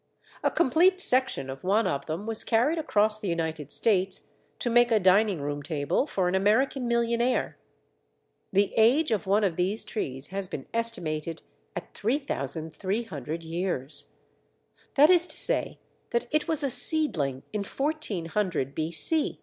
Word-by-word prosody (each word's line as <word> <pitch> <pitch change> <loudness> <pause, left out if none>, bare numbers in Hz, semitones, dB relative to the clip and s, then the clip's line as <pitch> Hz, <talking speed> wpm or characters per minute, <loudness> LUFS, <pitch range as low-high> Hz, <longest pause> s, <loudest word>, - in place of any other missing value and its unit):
A - - +2
complete 345 +5 +3
section 260 - +4
of 135 0 -8
one 205 +5 +2
of 140 - -2
them 165 +6 -4
was 225 -1 0
carried 255 +9 +1
across 215 -7 +1
the 210 - -5
United 160 -4 -3
States 195 -1 +1 0.3
to 240 - -2
make 240 0 +4
a 220 - +4
dining 190 -2 +3
room 145 0 -4
table 150 - -1
for 190 -10 -1
an 180 - -1
American 240 +7 +1
millionaire. 235 +1 0 0.9
The 200 +1 +1
age 245 +7 +4
of 210 -3 -1
one 205 +2 +2
of 180 -5 0
these 190 +5 0
trees 135 - -4
has 195 0 -4
been 135 - -7
estimated 165 -9 0 0.3
at 175 - -7
3300 165 - -3
years. 160 - -2 0.8
That 300 +5 +6
is 350 -1 +4
to - - -1
say - - 0 0.3
that 235 - -1
it 305 0 0
was 320 -3 +1
a 275 - 0
seedling 150 - 0
in 210 -1 -2
1400 195 - -2
B.C. 165 - +2
200 Hz, 150 wpm, -26 LUFS, 160-240 Hz, 0.9 s, That